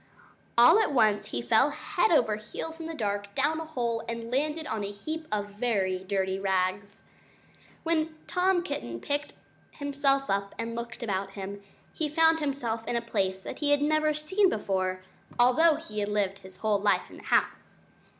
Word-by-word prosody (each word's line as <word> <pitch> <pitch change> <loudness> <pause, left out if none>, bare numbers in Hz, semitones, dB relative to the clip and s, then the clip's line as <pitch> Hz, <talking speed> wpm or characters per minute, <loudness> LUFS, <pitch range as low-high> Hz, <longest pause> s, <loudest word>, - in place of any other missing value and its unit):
All 245 - +8
at 435 - +2
once 215 -5 +3
he 120 - -3
fell 230 +6 +4
head 350 +5 0
over 235 -10 +3
heels 320 +10 -7
in 325 - -5
the 325 - -5
dark, 205 -4 -3
down 300 +4 +1
a 320 - -5
hole, 235 -7 -2
and 230 0 -4
landed 300 +4 0
on 220 -7 -3
a 200 - -3
heap 310 +10 -6
of 205 -1 -1
very 200 -4 0
dirty 190 -1 -1
rags. 195 +1 -1 0.8
When 320 -1 0
Tom 360 -1 +2
Kitten 120 - -4
picked 290 - -3 0.4
himself 275 -1 0
up 200 0 -1
and 230 0 -3
looked 235 +1 -6
about 195 -2 -2
him, 200 0 -6 0.3
he 310 -2 -1
found 320 +2 +4
himself 265 -6 -2
in - - -1
a - - +2
place 190 -4 -1
that - - -7
he 295 - +1
had 290 0 +3
never 310 0 +2
seen 370 +7 +2
before, 185 - -1 0.3
although 255 +7 +5
he 215 -6 -6
had 205 0 -1
lived 200 -2 -1 0.2
all 215 -1 +3
his - - -10
life 205 - +2
in - - -11
the - - -13
house. - - 0
235 Hz, 180 wpm, -28 LUFS, 200-305 Hz, 0.8 s, All